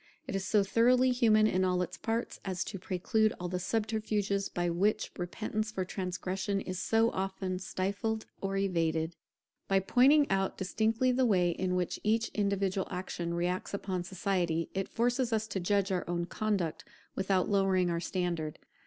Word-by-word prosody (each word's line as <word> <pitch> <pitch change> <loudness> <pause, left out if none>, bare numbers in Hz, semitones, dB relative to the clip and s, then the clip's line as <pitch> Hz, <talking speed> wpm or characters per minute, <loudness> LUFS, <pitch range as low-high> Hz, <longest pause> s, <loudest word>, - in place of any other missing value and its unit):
It 255 - -4
is 195 - -1
so 205 +1 +3
thoroughly 250 +5 +4
human 225 -4 +4
in 185 -3 +2
all 180 -1 +2
its 180 +1 -6
parts, 225 +3 -3
as 185 -2 -2
to 195 - -6
preclude 205 +4 +1
all 180 - -3
the 180 0 -2
subterfuges 210 -1 -1
by 175 0 -1
which 185 +5 +1
repentance 215 +4 -3
for 190 -4 -2
transgression 190 +1 -2
is 185 -2 -4
so 225 +1 +2
often 190 -1 -3
stifled 200 +4 -2 0.2
or 195 0 -1
evaded. 165 -4 0 0.5
By 195 0 +3
pointing 275 +9 +5
out 195 0 0
distinctly 220 +6 +1
the 255 0 +2
way 180 -5 +3
in 180 +1 -1
which 180 -1 -1
each 225 +2 +2
individual 200 -2 0
action 175 -2 -3
reacts 180 +3 -1
upon 185 -3 -3
society, 175 -3 -1
it 195 0 -2
forces 245 +1 +1
us 220 -1 +1
to 200 - -2
judge 195 +2 +1
our 180 -2 0
own 175 0 -1
conduct 195 -4 -1 0.3
without 190 -1 +1
lowering 190 -3 +2
our 170 - 0
standard. 170 -4 -2
195 Hz, 165 wpm, -31 LUFS, 180-215 Hz, 0.5 s, pointing